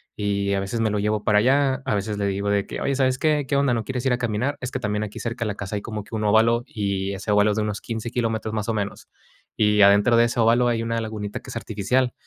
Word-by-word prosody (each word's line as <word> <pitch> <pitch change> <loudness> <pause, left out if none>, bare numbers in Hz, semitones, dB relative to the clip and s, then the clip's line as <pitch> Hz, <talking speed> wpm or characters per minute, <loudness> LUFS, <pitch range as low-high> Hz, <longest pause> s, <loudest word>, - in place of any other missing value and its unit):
Y 100 -1 -1
a 100 - +1
veces, 100 +4 -3
me 110 -1 +2
lo 105 - 0
llevo 105 0 0
para 105 -1 +4
allá, 135 +2 +2
a - - 0
veces, 105 +1 -2
le 100 - -1
digo 100 +1 -1
de 100 -1 +1
que: - - -6
"Oye, 140 - 0
¿sabes 130 -1 +1
qué?, 150 -2 +1
¿qué 140 - 0
onda, 140 -3 +2
no 115 -1 -1
quieres 130 -1 -4
ir 130 - +3
a - - +1
caminar?", 120 +5 -1
es 125 - -3
que 130 - -3
también 105 -1 -1
aquí 105 - -7
cerca 115 0 -3
de - - -1
la 105 - -3
casa 100 0 -5
hay - - -5
como 105 -2 -5
que 115 - -18
un 110 - -2
óvalo, 115 +3 +3
y 100 -2 -2
ese 100 +2 -4
óvalo 105 +1 +4
es 105 - -2
de 105 - +1
unos 105 -1 -3
15 115 0 -5
kilómetros, 110 -2 -2
más 105 +1 -2
o - - +1
menos, 100 -1 -4 0.5
y 105 -1 +3
adentro 100 +4 +6
de 115 - +6
ese 120 0 -2
óvalo, 120 +2 +4
hay 115 -1 0
una 115 0 -1
lagunita 105 -2 -5
que - - -13
es - - -7
artificial, 120 +5 0
110 Hz, 290 wpm, -23 LUFS, 105-120 Hz, 0.5 s, adentro